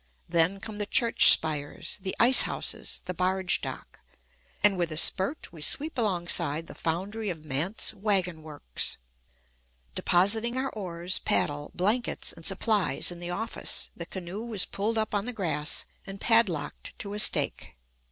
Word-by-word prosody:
Then 170 +3 +1
come 210 0 -8
the 205 - -2
church 230 +2 +7
spires, 150 +3 +1
the 190 0 -4
ice 245 +2 +7
houses, - - -2
the 180 - -4
barge 185 +1 0
dock, - - -8 0.6
and 205 -2 +5
with 175 -2 -1
a 155 - -4
spurt 190 - +2
we 160 - -12
sweep 300 - +2
alongside 175 - 0
the - - -11
foundry 195 +6 -4
of 160 -3 -7
Mandt's 155 +11 -2
wagon 190 -5 0
works. 150 - -3 1.0
Depositing 220 +7 +1
our 265 +1 -2
oars, 180 -3 -2
paddle, 145 0 0
blankets, 215 +7 -1
and 165 - -15
supplies 195 +1 0
in 175 - -9
the 175 0 -7
office, 220 +6 -2
the 170 - -8
canoe 190 +3 -7
was 220 -5 +2
pulled 220 +3 -2
up 215 -1 -2
on 205 0 -1
the 250 - -4
grass 165 -8 0 0.2
and 195 0 -8
padlocked 205 -11 +1
to 200 0 -5
a 210 - -2
stake. 210 - +2
190 Hz, 155 wpm, -27 LUFS, 170-215 Hz, 1.0 s, church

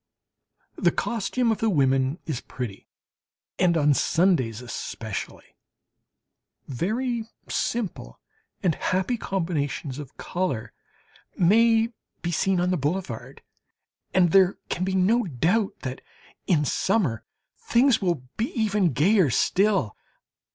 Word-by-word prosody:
The - - +3
costume 235 +1 0
of 220 - -1
the 225 - +2
women 135 -3 +2
is 145 -7 -3
pretty, 120 -6 -7 0.7
and 175 -2 +3
on 145 -1 +4
Sundays 160 - +2
especially 115 -3 -6 1.1
very 225 - -2 0.2
simple 190 - -3 0.4
and 175 -4 +3
happy 190 +10 0
combinations 160 - -3
of 140 -3 -10
colour 135 -11 -3 0.6
may 225 +5 +4 0.3
be 175 - -1
seen 185 +3 +1
on 180 +1 +1
the 180 - +1
boulevard. 145 -4 -4 0.7
And 180 -3 +3
there 190 0 +5
can 180 - -2
be 190 0 -1
no 215 +6 +3
doubt 180 - 0
that 130 -1 -5 0.5
in 155 -5 +3
summer 165 - 0 0.4
things 245 +1 +3
will 170 -8 0
be 225 +3 -1
even 205 -7 +2
gayer 180 - +4
still. 190 - +2
180 Hz, 115 wpm, -25 LUFS, 140-210 Hz, 1.1 s, there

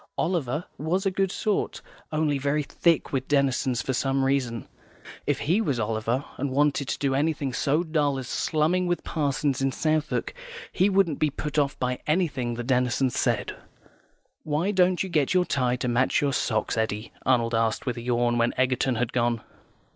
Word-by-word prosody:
Oliver 160 -3 -1
was 180 +6 -1
a 195 - +2
good 190 0 0
sort, 210 0 -1 0.3
only 155 -2 +1
very 145 +2 0
thick 165 +2 +1
with 130 -1 -1
Denison 135 -3 +1
for 130 +2 -1
some 135 +1 +1
reason. 130 -4 0 0.6
If - - 0
he 180 +9 +2
was 140 - -1
Oliver, 115 +4 -1
and 140 +1 -1
wanted 140 0 +1
to - - -2
do 140 -2 0
anything 145 -1 0
so 150 +6 +1
dull 150 -4 0
as 130 -2 -5
slumming 165 +7 +1
with 175 0 -1
parsons 145 -3 -1
in 135 0 +1
Southwark, 155 - -1 0.4
he 190 +3 +3
wouldn't 190 -6 +2
be 155 - +2
put 150 +1 -2
off 140 -1 0
by 125 0 -2
anything 145 -8 0
the 120 - -4
Denisons 125 0 +1
said. - - 0 0.9
"Why 155 +6 0
don't 185 -2 +3
you - - -4
get 155 -2 +1
your 180 -1 +4
tie 125 -5 +1
to 125 - -3
match 125 +2 +2
your 140 -1 0
socks, 110 -3 0
Eddy?" 110 -1 -2
Arnold 120 -2 +2
asked, 115 -1 0
with 125 - -1
a 120 - -6
yawn, 120 0 +1
when 115 +1 +1
Egerton 130 0 +1
had 120 0 -1
gone. 120 -2 +1
140 Hz, 180 wpm, -26 LUFS, 125-155 Hz, 0.9 s, your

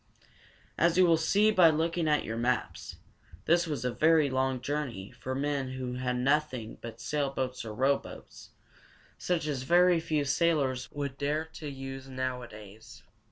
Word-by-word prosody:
As 170 +1 +3
you 185 - +6
will 170 -1 +5
see 200 +7 +3
by 180 -5 +6
looking 165 +1 0
at 150 -1 +2
your 110 - -4
maps, 120 +2 -2 0.5
this 170 +1 +3
was 140 -6 -3
a 125 - -1
very 155 -2 +3
long 130 0 0
journey 125 -7 -4
for 130 0 -5
men 140 -2 -2
who 130 -1 -4
had 125 0 -2
nothing 130 -3 -1
but 115 -1 -8
sailboats 135 -3 -2
or 110 -2 -7
rowboats, 135 +4 -2 0.7
such 175 -3 -1
as 145 -4 -2
very 175 +4 +4
few 155 -2 -1
sailors 140 -4 +1
would 140 -2 -5
dare 150 +3 -1
to 160 -2 -8
use 135 -1 -8
nowadays. 120 -4 -7
140 Hz, 155 wpm, -29 LUFS, 125-160 Hz, 0.7 s, you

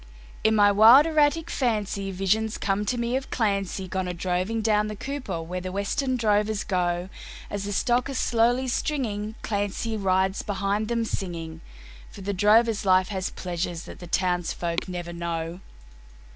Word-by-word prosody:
In 220 0 +4
my 205 -1 +6
wild 225 +8 +8
erratic 315 +1 +2
fancy 210 -5 -1
visions 205 +4 0
come 200 +1 -1
to 245 - -1
me 235 +1 -1
of 265 0 -3
Clancy 200 -4 -1
Gone 185 0 -2
a 180 - -3
droving 185 +6 -1
"down 210 -1 +2
the 215 - -5
Cooper" 260 -8 -4
where 180 +2 -5
the 185 0 -5
Western 255 +7 -1
drovers 210 -1 +1
go; 175 -1 -1 0.4
As 200 -1 -3
the 205 - -3
stock 240 +6 +1
are 275 - -4
slowly 245 +1 +2
stringing, 220 -6 -2
Clancy 205 +2 -2
rides 190 -1 +1
behind 205 +1 -1
them 230 0 0
singing, 165 -6 -5 0.5
For - - -12
the 200 +1 -2
drover's 215 +3 +4
life 185 -1 +3
has 190 -3 -2
pleasures 175 -1 -4
that - - -11
the 175 - -9
townsfolk 175 -1 -1
never 175 -1 -5
know. 170 0 -4
205 Hz, 160 wpm, -25 LUFS, 185-225 Hz, 0.5 s, wild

